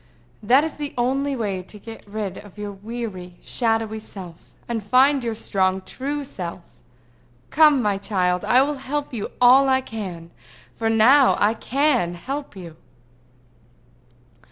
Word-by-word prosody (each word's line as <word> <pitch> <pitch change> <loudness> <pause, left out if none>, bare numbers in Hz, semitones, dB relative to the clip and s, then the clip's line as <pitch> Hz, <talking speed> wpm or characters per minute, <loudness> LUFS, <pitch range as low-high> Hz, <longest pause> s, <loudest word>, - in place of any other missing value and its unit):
"That 255 +7 +4
is 320 - -3
the 290 -1 -6
only 270 +3 0
way 200 -6 -2
to 190 +3 -12
get 225 +1 -11
rid 205 -3 -4
of 205 -1 -15
your 205 -1 -5
weary, 200 -3 -7
shadowy 225 -2 -1
self, 185 -6 -11
and 230 -2 -3
find 260 +5 +4
your 230 -2 -2
strong, 190 -3 0
true 285 +6 -4
self. 180 -9 -8 0.7
Come, 300 -4 +5
my 205 -2 0
child; 180 -3 0
I 255 +2 +4
will 290 0 -3
help 290 +1 -4
you 220 -4 -4
all 260 +2 +6
I 260 0 +4
can, 185 -9 -7 0.4
for 225 -1 -1
now 250 +5 +5
I 210 +2 +3
can 250 - 0
help 275 +7 -6
you." 170 -4 -10
225 Hz, 145 wpm, -22 LUFS, 195-265 Hz, 0.7 s, all